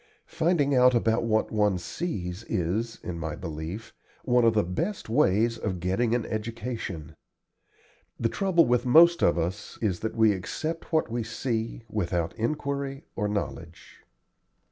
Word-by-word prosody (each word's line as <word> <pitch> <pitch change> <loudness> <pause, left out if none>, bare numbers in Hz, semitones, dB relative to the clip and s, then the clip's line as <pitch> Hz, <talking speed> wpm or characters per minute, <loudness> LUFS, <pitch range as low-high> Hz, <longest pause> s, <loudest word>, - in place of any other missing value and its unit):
Finding 160 -4 +2
out 125 -1 +5
about 115 0 +2
what 110 -1 +1
one 105 -3 +2
sees 90 - -4
is, 105 +7 -1
in 85 -2 -5
my 80 -1 -3
belief, 85 +6 -6 0.3
one 125 -1 +4
of 115 -1 +4
the 105 - +4
best 165 - -3
ways 110 +1 +2
of 95 -5 -3
getting 100 +7 +1
an 120 - -1
education. 110 -7 -5 1.0
The 115 - +2
trouble 180 - +3
with 120 0 +2
most 170 +7 +6
of 85 - +3
us 90 +5 -3
is 100 -6 0
that 110 - -3
we 110 -1 +5
accept 155 - -4
what 160 -7 +1
we 120 0 -1
see, 115 0 -3
without 85 -6 -2
inquiry 140 +3 -2
or 105 - 0
knowledge. 85 -5 -5
110 Hz, 145 wpm, -27 LUFS, 90-125 Hz, 1.0 s, most